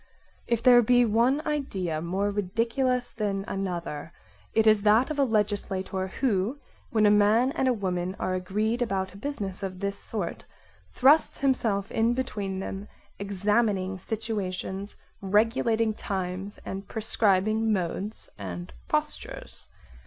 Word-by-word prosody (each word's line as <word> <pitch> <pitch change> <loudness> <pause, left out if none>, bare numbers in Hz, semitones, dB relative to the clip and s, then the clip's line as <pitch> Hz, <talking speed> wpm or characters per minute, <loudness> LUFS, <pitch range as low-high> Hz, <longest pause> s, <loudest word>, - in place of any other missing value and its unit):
If 235 -1 0
there 245 -1 +8
be 245 +1 +4
one 240 +7 +2
idea 190 - -2
more 190 +5 -1
ridiculous 230 +6 0
than 200 -3 -2
another, 170 -5 -4 0.4
it 220 0 +3
is 215 -1 +5
that 220 +7 +4
of 295 - -3
a - - +5
legislator 200 -4 -1
who, 220 +2 0 0.3
when 220 -2 +3
a 205 - +6
man 210 +5 +4
and 265 - 0
a 255 - +4
woman 185 -3 -2
are 185 - -1
agreed 210 +6 -1
about 190 -5 -1
a - - -11
business 200 -7 -4
of 185 -2 -5
this 200 0 -3
sort, 200 -7 -4 0.5
thrusts 290 +5 +4
himself 225 -7 +1
in 230 +2 +2
between 205 -7 -3
them, 195 +1 -5 0.3
examining 200 -1 0
situa 215 -1 -3
tions, 190 +2 -5 0.2
regulating 220 +2 +2
times 190 0 -4
and 195 +1 -5
prescribing 215 0 +2
modes 195 +2 -2
and 90 -6 -6
postures. - - -3
205 Hz, 135 wpm, -27 LUFS, 190-230 Hz, 0.5 s, there